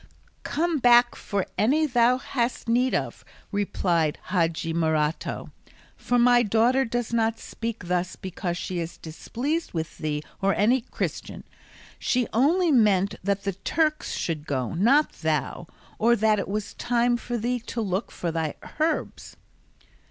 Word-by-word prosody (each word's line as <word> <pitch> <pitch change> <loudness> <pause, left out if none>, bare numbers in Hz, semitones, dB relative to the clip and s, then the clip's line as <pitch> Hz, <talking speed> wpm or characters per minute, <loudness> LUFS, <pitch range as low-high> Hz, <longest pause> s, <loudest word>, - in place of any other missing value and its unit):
"Come 330 0 -1
back 240 -1 +6
for 200 -2 -2
any 290 +9 +3
thou 245 -2 +3
hast 245 -2 -2
need 250 +3 +2
of," - - -3 0.3
replied 175 -6 0
Hadji 165 -2 0
Morato; 160 -1 -1 0.4
"for 245 - 0
my 245 0 +5
daughter 240 +4 +3
does 235 0 -3
not 225 -1 +1
speak 230 -4 -6
thus 180 0 -1
because 180 -1 -4
she 180 0 -3
is 165 0 -5
displeased 260 - -4
with 160 -2 -4
thee 150 -1 -2 0.2
or 195 0 +2
any 240 +5 +3
Christian: 230 - -5 0.6
she 250 -1 +1
only 320 - +3
meant 205 -6 +3
that 200 0 0
the 200 -1 -1
Turks 305 - -1
should 155 -3 -3
go, 130 -1 -2
not 250 - +3
thou; 160 +1 -1 0.3
or 235 +2 +4
that 215 -1 +2
it - - -3
was 210 +1 -3
time 240 0 +1
for 240 0 -3
thee 245 +2 -1
to 235 0 -6
look 195 -1 -1
for 170 - -3
thy 160 -2 -2 0.2
herbs." 320 +2 -2
220 Hz, 145 wpm, -25 LUFS, 175-245 Hz, 0.6 s, back